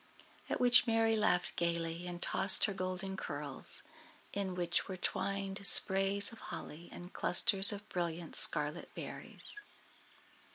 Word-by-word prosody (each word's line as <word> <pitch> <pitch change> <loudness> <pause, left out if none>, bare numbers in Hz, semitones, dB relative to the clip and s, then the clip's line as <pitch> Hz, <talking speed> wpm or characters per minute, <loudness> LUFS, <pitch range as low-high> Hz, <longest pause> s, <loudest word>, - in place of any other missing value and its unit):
At - - -5
which 250 0 +1
Merry 225 0 -1
laughed 180 -4 -3
gayly, 170 0 -6
and 175 -1 -10
tossed 195 +1 +3
her 200 - -6
golden 185 +1 -8
curls, 145 -6 +1 0.5
in 195 -2 -6
which 175 -1 -4
were 190 - -9
twined 195 +2 -6
sprays 195 +2 +8
of 230 - -14
holly 165 +3 -12
and 175 +1 -14
clusters 195 +3 0
of 205 0 -10
brilliant 170 -1 -8
scarlet - - -2
berries. 420 - -8
190 Hz, 130 wpm, -30 LUFS, 175-200 Hz, 0.5 s, sprays